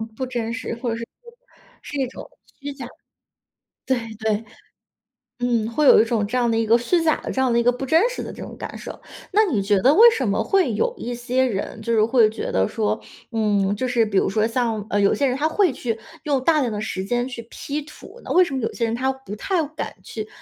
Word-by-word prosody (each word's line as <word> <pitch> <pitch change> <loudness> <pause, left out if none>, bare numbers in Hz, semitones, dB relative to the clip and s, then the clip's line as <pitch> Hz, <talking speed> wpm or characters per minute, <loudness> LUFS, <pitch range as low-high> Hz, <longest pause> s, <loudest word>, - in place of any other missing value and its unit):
不 260 - -3
真 235 -3 -3
实， 255 -1 -4
或 235 +1 -3
者 - - -1
是 230 0 -6
不 475 -1 -14 0.5
是 290 - -7
一 265 - +1
种 250 - -10 0.3
虚 285 0 -5
假 270 -3 -8
的。 245 - -11 1.0
对， 260 -1 +2 0.2
对。 220 0 -1 1.0
嗯， 235 -3 +1
会 300 +6 +1
有 - - +8
一 - - +4
种 225 -3 0
这 250 - -1
样 240 -2 +2
的 225 - +1
一 225 - +1
个 225 +2 +5
虚 330 +9 +1
假 320 -1 +3
的， - - -5
这 265 - -1
样 255 -2 +2
的 - - +3
一 235 - +3
个 245 - +5
不 250 +2 -5
真 325 - +4
实 - - -5
的 - - -6
这 - - -8
种 - - -9
感 - - -6
受。 - - -9 0.3
那 430 +2 +4
你 255 - 0
觉 200 0 +2
得 260 +9 +5
为 460 +7 +9
什 265 - -1
么 200 - +1
会 390 -2 +2
有 475 +1 0
一 245 +1 -4
些 250 +2 0
人 220 -1 -3
就 230 +1 -1
是 220 -1 +4
会 230 -1 +4
觉 220 - -5
得 95 0 +2
说， 215 - -1 0.3
嗯， 205 -3 +1
就 255 +5 -2
是 240 -2 +2
比 205 -2 -1
如 - - +3
说 215 +2 +1
像， 230 -3 -1
呃， 205 - +1
有 200 - +4
些 285 - +1
人 255 -1 +1
他 300 +3 +1
会 360 +1 +2
去 235 -3 -3 0.3
用 280 -4 0
大 315 +1 +4
量 255 -4 +1
的 210 - -3
时 190 -3 -3
间 240 +4 0
去 245 -2 -6
P 300 +2 -4
图， 305 +10 -14
那 - - -2
为 365 - +7
什 335 - -4
么 265 - -1
有 225 - -2
些 235 - -3
人 225 -1 0
他 260 +3 0
不 265 -7 -10
太 350 - 0
敢 305 +2 -6
去 215 -1 -6
245 Hz, 275 characters per minute, -22 LUFS, 220-275 Hz, 1.0 s, 为